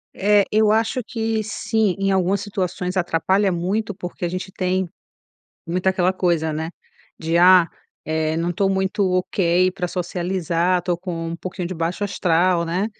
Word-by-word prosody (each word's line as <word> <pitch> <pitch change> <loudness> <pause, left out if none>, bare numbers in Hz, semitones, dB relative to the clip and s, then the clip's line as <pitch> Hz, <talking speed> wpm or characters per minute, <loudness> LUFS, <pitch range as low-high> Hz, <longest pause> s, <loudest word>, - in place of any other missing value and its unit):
É, 205 0 +4
eu 215 0 +4
acho 225 +3 +1
que 225 -1 -2
sim. 215 -2 0
Em 195 0 +1
algumas 190 +1 +1
situações 185 -2 -3
atrapalha 185 +3 +1
muito, 195 +5 -1
porque 180 0 -6
a - - -1
gente 185 +2 -5
tem 185 -1 -1 0.8
muito 180 +2 -3
aquela 185 -1 +2
coisa, 170 -4 0
né, 160 +2 -3 0.5
de 165 +1 -1
"ah", 180 -1 +7 0.4
eh, 155 0 -1
"não 170 +2 -1
tô 195 +3 +1
muito 190 +1 -1
ok 185 -1 +2
para 180 -1 -3
socializar. 180 0 -1
Tô 175 0 0
com 170 -2 -5
um 165 - -4
pouquinho 185 0 -5
de 185 - -5
baixo 170 +4 -2
astral", 180 -2 +2
né? 180 +5 -1
185 Hz, 160 wpm, -21 LUFS, 170-195 Hz, 0.8 s, ah